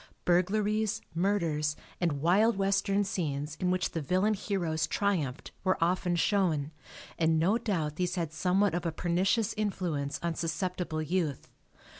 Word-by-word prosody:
Burglaries, 210 Hz, +4 st, +2 dB
murders 165 Hz, -5 st, 0 dB, 0.2 s
and 155 Hz, -5 st, 0 dB
wild 205 Hz, +6 st, +4 dB
western 200 Hz, +1 st, +2 dB
scenes 150 Hz, -6 st, -3 dB
in 180 Hz, -, +1 dB
which 180 Hz, -1 st, 0 dB
the 165 Hz, -, -3 dB
villain 185 Hz, +9 st, +2 dB
heroes 170 Hz, -6 st, -1 dB
triumphed 160 Hz, -10 st, -1 dB
were 185 Hz, 0 st, +2 dB
often 175 Hz, +1 st, +1 dB
shown 165 Hz, -5 st, +1 dB, 0.5 s
and 160 Hz, -1 st, +3 dB
no 190 Hz, +9 st, +3 dB
doubt 160 Hz, -9 st, -2 dB
these 180 Hz, 0 st, -1 dB
had 165 Hz, -4 st, -2 dB
somewhat 185 Hz, +3 st, +2 dB
of 175 Hz, -, -1 dB
a 165 Hz, -, -1 dB
pernicious 190 Hz, +7 st, +1 dB
influence 175 Hz, -9 st, -2 dB
on 170 Hz, -1 st, 0 dB
susceptible 170 Hz, -1 st, -2 dB
youth. 155 Hz, -4 st, -2 dB
180 Hz, 140 wpm, -30 LUFS, 160-195 Hz, 0.5 s, wild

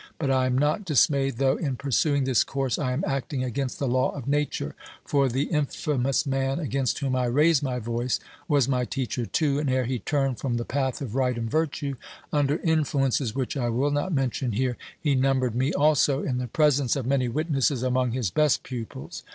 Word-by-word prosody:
But 140 Hz, -4 st, 0 dB
I 130 Hz, -1 st, +2 dB
am 130 Hz, 0 st, +1 dB
not 150 Hz, +8 st, +1 dB
dismayed, 140 Hz, -5 st, +2 dB
though, 135 Hz, +1 st, +2 dB
in 140 Hz, -5 st, -2 dB
pursuing 140 Hz, +2 st, +1 dB
this 130 Hz, -2 st, +3 dB
course, 135 Hz, -3 st, -2 dB
I 130 Hz, -3 st, -1 dB
am 130 Hz, +5 st, -1 dB
acting 135 Hz, -1 st, -2 dB
against 130 Hz, +1 st, -3 dB
the 140 Hz, -, -1 dB
law 130 Hz, +1 st, +2 dB
of 135 Hz, -3 st, -7 dB
Nature; 140 Hz, -, -1 dB, 0.3 s
for 140 Hz, -2 st, +2 dB
the 130 Hz, +4 st, 0 dB
infamous 145 Hz, -3 st, 0 dB
man 135 Hz, 0 st, 0 dB
against 135 Hz, -5 st, -1 dB
whom 135 Hz, -2 st, -1 dB
I 125 Hz, -1 st, +1 dB
raise 150 Hz, +5 st, +3 dB
my 130 Hz, -3 st, -2 dB
voice 120 Hz, +1 st, -1 dB, 0.3 s
was 145 Hz, -6 st, +3 dB
my 125 Hz, -2 st, +1 dB
teacher, 125 Hz, -2 st, -3 dB
too, 145 Hz, -3 st, +1 dB
and 150 Hz, -2 st, -1 dB
ere 130 Hz, -1 st, +1 dB
he 125 Hz, 0 st, -2 dB
turned 135 Hz, -3 st, -1 dB
from 125 Hz, -3 st, -1 dB
the 120 Hz, -, -3 dB
path 130 Hz, -1 st, -2 dB
of 115 Hz, -6 st, -6 dB
right 125 Hz, -2 st, +1 dB
and 115 Hz, -1 st, -2 dB
virtue 145 Hz, -3 st, -1 dB, 0.4 s
under 145 Hz, 0 st, +2 dB
influences 140 Hz, -7 st, +1 dB
which 130 Hz, 0 st, -2 dB
I 120 Hz, -4 st, 0 dB
will 130 Hz, +5 st, +1 dB
not 145 Hz, +6 st, -1 dB
mention 130 Hz, -4 st, -1 dB
here 125 Hz, +3 st, 0 dB, 0.2 s
he 150 Hz, -3 st, +1 dB
numbered 130 Hz, -2 st, +2 dB
me 130 Hz, +5 st, +1 dB
also, 145 Hz, -1 st, +3 dB
in 125 Hz, -2 st, -1 dB
the 125 Hz, -, -3 dB
presence 140 Hz, -1 st, +2 dB
of 135 Hz, -4 st, -3 dB
many 130 Hz, -1 st, +1 dB
witnesses, 135 Hz, -2 st, 0 dB
among 130 Hz, 0 st, +1 dB
his 120 Hz, -8 st, -1 dB
best 150 Hz, -, +2 dB
pupils. 120 Hz, -4 st, -7 dB
135 Hz, 200 wpm, -26 LUFS, 125-145 Hz, 0.4 s, this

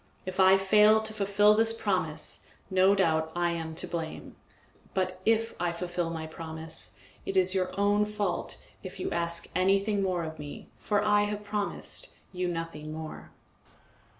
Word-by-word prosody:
If 185 Hz, 0 st, -5 dB
I 190 Hz, 0 st, +7 dB
fail 210 Hz, +3 st, +5 dB
to 220 Hz, 0 st, -3 dB
fulfil 205 Hz, 0 st, +4 dB
this 225 Hz, +1 st, +2 dB
promise, 180 Hz, -6 st, -1 dB, 0.2 s
no 190 Hz, +1 st, +5 dB
doubt 160 Hz, -4 st, +2 dB
I 175 Hz, 0 st, +1 dB
am 160 Hz, -1 st, -4 dB
to -, -, -3 dB
blame; 165 Hz, -2 st, -5 dB, 0.6 s
but 185 Hz, -1 st, -1 dB
if 225 Hz, 0 st, +3 dB
I 175 Hz, -1 st, +1 dB
fulfil 175 Hz, 0 st, -2 dB
my 160 Hz, -1 st, -4 dB
promise, 160 Hz, 0 st, -6 dB, 0.2 s
it 195 Hz, -, -2 dB
is 185 Hz, 0 st, +4 dB
your 185 Hz, -1 st, +1 dB
own 205 Hz, +1 st, +3 dB
fault 210 Hz, -3 st, -2 dB, 0.2 s
if 185 Hz, 0 st, -8 dB
you -, -, -2 dB
ask 170 Hz, 0 st, -1 dB
anything 195 Hz, +2 st, +2 dB
more 185 Hz, -3 st, 0 dB
of 160 Hz, -1 st, -6 dB
me, 145 Hz, -1 st, -8 dB
for 205 Hz, -1 st, +1 dB
I 205 Hz, 0 st, +4 dB
have 210 Hz, 0 st, -4 dB
promised 210 Hz, -1 st, -3 dB, 0.2 s
you 180 Hz, -1 st, -2 dB
nothing 165 Hz, -3 st, -4 dB
more. 155 Hz, 0 st, -7 dB
185 Hz, 160 wpm, -29 LUFS, 165-205 Hz, 0.6 s, I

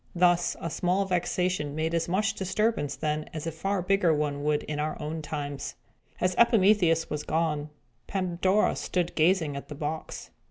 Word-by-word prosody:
Thus, 175 Hz, 0 st, +3 dB
a 165 Hz, -, -4 dB
small 185 Hz, +4 st, +1 dB
vexation 180 Hz, -4 st, -1 dB
made 160 Hz, +1 st, -1 dB
as 165 Hz, -1 st, 0 dB
much 200 Hz, +3 st, +1 dB
disturbance 195 Hz, -4 st, 0 dB
then 155 Hz, 0 st, -2 dB
as 155 Hz, -, -4 dB
a 165 Hz, -, -2 dB
far 190 Hz, +4 st, -2 dB
bigger 195 Hz, -2 st, +3 dB
one 145 Hz, -2 st, -1 dB
would 150 Hz, 0 st, +1 dB
in 150 Hz, -1 st, -4 dB
our 155 Hz, +1 st, -2 dB
own 155 Hz, +1 st, -4 dB
times. 145 Hz, -2 st, -5 dB, 0.4 s
After 180 Hz, +3 st, +2 dB
Epimetheus 195 Hz, -8 st, +4 dB
was 150 Hz, -, -2 dB
gone, 155 Hz, -2 st, -1 dB, 0.4 s
Pandora 185 Hz, +1 st, +1 dB
stood 175 Hz, -2 st, -1 dB
gazing 160 Hz, -3 st, +2 dB
at 140 Hz, -, -6 dB
the 150 Hz, -, -7 dB
box. 155 Hz, +2 st, -5 dB
165 Hz, 165 wpm, -28 LUFS, 150-185 Hz, 0.4 s, Epimetheus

